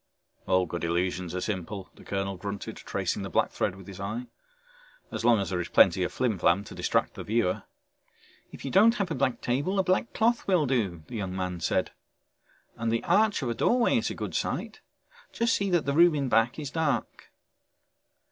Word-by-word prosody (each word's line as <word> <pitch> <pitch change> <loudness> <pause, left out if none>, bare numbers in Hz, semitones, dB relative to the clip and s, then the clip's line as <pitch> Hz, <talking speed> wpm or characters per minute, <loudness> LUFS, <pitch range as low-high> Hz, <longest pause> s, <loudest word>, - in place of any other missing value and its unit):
"All 95 0 +3
good 85 0 -5
illusions 90 +1 -1
are 90 - -2
simple," 95 -1 -4
the - - -16
colonel 95 0 -2
grunted, 100 +2 -6
tracing - - -3
the - - -5
black - - +1
thread - - -1
with 95 -1 -12
his 95 -1 -10
eye. 110 +5 -4 0.9
"As - - -4
long 120 -2 +5
as 100 - -2
there 90 -1 0
is 85 - -4
plenty 95 0 +5
of 90 - 0
flimflam 100 -6 +1
to 105 - -11
distract - - 0
the - - -7
viewer." 110 -4 0 0.9
"If - - -10
you 135 - -3
don't 225 +5 +6
have 200 -6 -2
a - - +1
black 130 -3 0
table, 145 +11 0
a 190 - +3
black 185 +5 +1
cloth 235 +2 +1
will 180 -6 +3
do," 105 - -1
the 115 - -7
young 95 -3 -4
man 90 -2 -3
said. 80 - 0 0.9
"And 115 -1 -1
the 115 - 0
arch 200 -1 +3
of 125 - -1
a - - 0
doorway 235 - +3
is - - -2
a - - -5
good - - -5
site, - - -3 0.5
just 230 0 +1
see 200 -1 0
that 175 -3 +2
the 140 - 0
room 170 +1 +6
in 140 -3 -1
back 115 +1 +2
is 145 -3 -5
dark." 160 -4 -2
115 Hz, 205 wpm, -28 LUFS, -, 0.9 s, don't